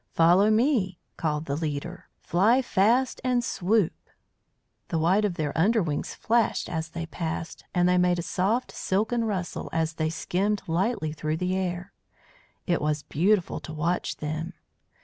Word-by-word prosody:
"Follow 175 Hz, +5 st, +5 dB
me," 215 Hz, -, +2 dB, 0.2 s
called 155 Hz, -1 st, -1 dB
the 140 Hz, -, -2 dB
leader. 160 Hz, +3 st, -4 dB
"Fly 220 Hz, +9 st, +3 dB
fast 240 Hz, +5 st, +2 dB
and 250 Hz, -1 st, +1 dB
swoop!" 205 Hz, -3 st, +1 dB, 0.9 s
The 165 Hz, -, -1 dB
white 180 Hz, +6 st, +3 dB
of 190 Hz, -4 st, -1 dB
their 150 Hz, -3 st, -2 dB
under 210 Hz, +6 st, +3 dB
wings 150 Hz, -3 st, -3 dB
flashed 230 Hz, 0 st, +1 dB
as 160 Hz, -1 st, -3 dB
they 165 Hz, +1 st, -5 dB
passed, 165 Hz, 0 st, -5 dB
and 175 Hz, 0 st, +4 dB
they 180 Hz, 0 st, +4 dB
made 180 Hz, 0 st, +3 dB
a 170 Hz, -, -2 dB
soft, 205 Hz, +9 st, 0 dB
silken 220 Hz, +5 st, 0 dB
rustle 185 Hz, -5 st, -3 dB
as 165 Hz, 0 st, 0 dB
they 155 Hz, 0 st, -1 dB
skimmed 200 Hz, +5 st, -1 dB
lightly 170 Hz, -1 st, 0 dB
through 155 Hz, 0 st, -2 dB
the 180 Hz, +2 st, -1 dB
air. 185 Hz, 0 st, -3 dB, 0.7 s
It 175 Hz, -2 st, +1 dB
was 150 Hz, -1 st, 0 dB
beautiful 185 Hz, +4 st, +1 dB
to 155 Hz, -, -8 dB
watch 165 Hz, +4 st, -1 dB
them. 155 Hz, +2 st, -4 dB
180 Hz, 155 wpm, -26 LUFS, 160-210 Hz, 0.9 s, Follow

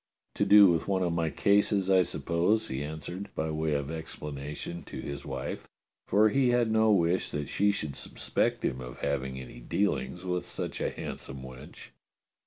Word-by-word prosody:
"To -, -, +1 dB
do 100 Hz, +1 st, +9 dB
with 85 Hz, -4 st, +2 dB
one 95 Hz, -2 st, +1 dB
of 85 Hz, -2 st, 0 dB
my 85 Hz, -1 st, 0 dB
cases, 100 Hz, +3 st, +2 dB
I 95 Hz, -1 st, +6 dB
suppose," 85 Hz, +8 st, +1 dB
he 65 Hz, +2 st, -3 dB
answered, 80 Hz, +6 st, -6 dB
by 80 Hz, 0 st, -1 dB
way 80 Hz, -1 st, 0 dB
of 70 Hz, +1 st, -2 dB
explanation, 75 Hz, 0 st, -6 dB
to -, -, -7 dB
his 70 Hz, 0 st, -6 dB
wife, 65 Hz, -2 st, -5 dB, 0.4 s
for 110 Hz, +1 st, +5 dB
he 130 Hz, +2 st, +3 dB
had 120 Hz, -2 st, +2 dB
no 110 Hz, 0 st, +4 dB
wish 90 Hz, -2 st, +2 dB
that 75 Hz, -1 st, -4 dB
she 100 Hz, +1 st, +3 dB
should 75 Hz, -8 st, -4 dB
suspect -, -, -1 dB
him 65 Hz, -1 st, -1 dB
of 60 Hz, 0 st, -8 dB
having 65 Hz, -2 st, -2 dB
any 65 Hz, -2 st, -10 dB
dealings 65 Hz, +7 st, -1 dB
with 90 Hz, -1 st, -1 dB
such -, -, -4 dB
a -, -, +1 dB
handsome 65 Hz, -1 st, -7 dB
wench. 65 Hz, 0 st, -11 dB
80 Hz, 180 wpm, -29 LUFS, 70-100 Hz, 0.4 s, do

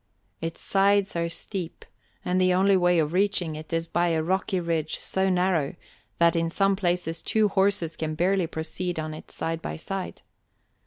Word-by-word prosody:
Its 165 Hz, 0 st, -4 dB
sides 200 Hz, 0 st, +2 dB
are 170 Hz, 0 st, 0 dB
steep, 175 Hz, 0 st, -5 dB, 0.4 s
and 185 Hz, +1 st, +1 dB
the 185 Hz, 0 st, +4 dB
only 195 Hz, +1 st, +4 dB
way 175 Hz, -1 st, +3 dB
of 155 Hz, 0 st, +1 dB
reaching 185 Hz, -4 st, +1 dB
it 155 Hz, 0 st, -9 dB
is 165 Hz, 0 st, 0 dB
by 175 Hz, +1 st, +1 dB
a 160 Hz, -2 st, +1 dB
rocky 190 Hz, +2 st, 0 dB
ridge 165 Hz, -2 st, -1 dB
so 190 Hz, 0 st, 0 dB
narrow 180 Hz, -5 st, +1 dB, 0.4 s
that 170 Hz, 0 st, +4 dB
in 165 Hz, 0 st, +1 dB
some 195 Hz, +3 st, +2 dB
places 175 Hz, -3 st, -1 dB
two 215 Hz, -1 st, +2 dB
horses 190 Hz, -4 st, +1 dB
can 155 Hz, -1 st, -3 dB
barely 180 Hz, +2 st, +2 dB
proceed 170 Hz, +2 st, -4 dB
on 155 Hz, 0 st, -3 dB
it 155 Hz, -, -10 dB
side 165 Hz, 0 st, -3 dB
by -, -, -4 dB
side. 190 Hz, +3 st, -5 dB
175 Hz, 175 wpm, -26 LUFS, 165-190 Hz, 0.4 s, the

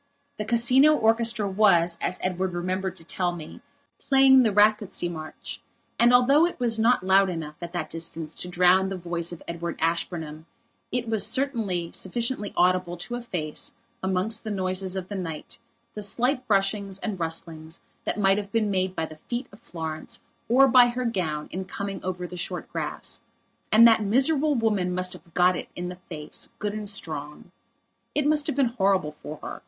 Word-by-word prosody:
The 210 Hz, -, -3 dB
Casino 250 Hz, +7 st, +5 dB
orchestra 225 Hz, -3 st, +2 dB
was, 180 Hz, -4 st, +3 dB
as 180 Hz, -, 0 dB
Edward 185 Hz, 0 st, -1 dB
remembered 185 Hz, +2 st, -2 dB
to -, -, -9 dB
tell 175 Hz, +1 st, -1 dB
me, 160 Hz, -3 st, -10 dB, 0.4 s
playing 270 Hz, -1 st, +6 dB
the 225 Hz, -4 st, +3 dB
Rakocsy 210 Hz, -3 st, +2 dB
march, 155 Hz, -2 st, -8 dB, 0.4 s
and 240 Hz, +1 st, +6 dB
although 275 Hz, +7 st, +5 dB
it 350 Hz, -, -8 dB
was 230 Hz, -2 st, +2 dB
not 230 Hz, -3 st, +3 dB
loud 190 Hz, 0 st, +4 dB
enough, 160 Hz, -4 st, -5 dB
at 170 Hz, -1 st, -6 dB
that 175 Hz, -3 st, -3 dB
distance, 165 Hz, -1 st, -4 dB
to -, -, -5 dB
drown 180 Hz, +2 st, +4 dB
the 190 Hz, -1 st, -4 dB
voice 170 Hz, -1 st, -2 dB
of 175 Hz, -, -9 dB
Edward 170 Hz, 0 st, -4 dB
Ashburnham 160 Hz, -1 st, -2 dB, 0.4 s
it 245 Hz, -1 st, -2 dB
was 220 Hz, -2 st, +3 dB
certainly 225 Hz, -11 st, 0 dB
sufficiently 230 Hz, +2 st, -2 dB
audible 180 Hz, -1 st, +2 dB
to 210 Hz, +8 st, -6 dB
efface, 180 Hz, -11 st, -4 dB, 0.3 s
amongst 190 Hz, +4 st, -1 dB
the 220 Hz, -, -5 dB
noises 185 Hz, -1 st, -1 dB
of 185 Hz, -1 st, -4 dB
the 205 Hz, -, -7 dB
night, 165 Hz, -6 st, -6 dB, 0.3 s
the 210 Hz, -, -6 dB
slight 250 Hz, +5 st, +1 dB
brushings 195 Hz, -1 st, +1 dB
and 195 Hz, -2 st, -4 dB
rustlings 160 Hz, -1 st, -4 dB, 0.2 s
that -, -, -3 dB
might 195 Hz, 0 st, +3 dB
have 200 Hz, -1 st, -7 dB
been 215 Hz, -2 st, +1 dB
made 185 Hz, -1 st, -1 dB
by 160 Hz, -, -1 dB
the 155 Hz, -1 st, -11 dB
feet 240 Hz, -, -5 dB
of 205 Hz, -, -16 dB
Florence 160 Hz, +7 st, -6 dB, 0.3 s
or 265 Hz, +3 st, +6 dB
by 245 Hz, -1 st, +7 dB
her 245 Hz, +1 st, -3 dB
gown 160 Hz, -9 st, -2 dB
in 190 Hz, -, -4 dB
coming 200 Hz, +1 st, -6 dB
over 180 Hz, -1 st, -3 dB
the 180 Hz, 0 st, -8 dB
short 175 Hz, -, -3 dB
grass. -, -, -3 dB, 0.5 s
And 230 Hz, +2 st, +8 dB
that 225 Hz, -1 st, +5 dB
miserable 275 Hz, +8 st, +2 dB
woman 205 Hz, -6 st, 0 dB
must 185 Hz, 0 st, -1 dB
have 175 Hz, -2 st, -13 dB
got 180 Hz, 0 st, +4 dB
it -, -, -6 dB
in 180 Hz, 0 st, -4 dB
the 180 Hz, 0 st, -9 dB
face, 150 Hz, -3 st, -4 dB
good 205 Hz, 0 st, -3 dB
and 210 Hz, -1 st, -5 dB
strong. 150 Hz, -6 st, -6 dB, 0.6 s
It 295 Hz, -, +1 dB
must 300 Hz, 0 st, +2 dB
have 300 Hz, -, -1 dB
been 275 Hz, -1 st, +3 dB
horrible 195 Hz, -9 st, +1 dB
for 150 Hz, 0 st, -9 dB
her. -, -, -6 dB
190 Hz, 180 wpm, -25 LUFS, 175-230 Hz, 0.6 s, And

